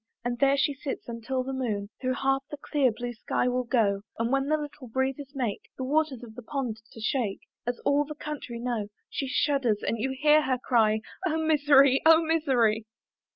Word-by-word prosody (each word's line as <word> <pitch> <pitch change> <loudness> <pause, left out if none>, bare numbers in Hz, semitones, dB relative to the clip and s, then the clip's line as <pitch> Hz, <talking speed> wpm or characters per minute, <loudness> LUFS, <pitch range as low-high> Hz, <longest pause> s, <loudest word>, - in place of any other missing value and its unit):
And 240 0 -2
there 275 +1 +4
she 285 +1 +2
sits, 275 0 -6
until 240 +2 -3
the 270 +1 -4
moon 215 -6 -2
Through 255 -1 0
half 270 +1 +1
the 295 - -6
clear 280 -3 +1
blue 240 +2 -5
sky 235 - -1
will 250 0 0
go, 210 -5 +2 0.2
And 230 +1 -1
when 275 0 +1
the 310 +1 +2
little 295 -3 -8
breezes 265 +3 -2
make 240 -7 -3
The 260 - -3
waters 280 -2 0
of 225 -2 -10
the 245 - -9
pond 240 -3 -4
to - - -11
shake, 220 -2 -1 0.3
As 245 0 -1
all 285 +1 +3
the 300 +1 -8
country 295 -5 -6
know, 235 -3 -2 0.2
She 275 - -2
shudders 260 -5 +1
and 230 - -1
you 260 +5 0
hear 305 +1 +6
her 260 -3 0
cry, 220 -4 +2 0.3
"Oh 320 -1 0
misery! 290 -4 +5
oh 325 +1 +7
misery! 250 -9 +2
260 Hz, 200 wpm, -27 LUFS, 235-285 Hz, 0.3 s, oh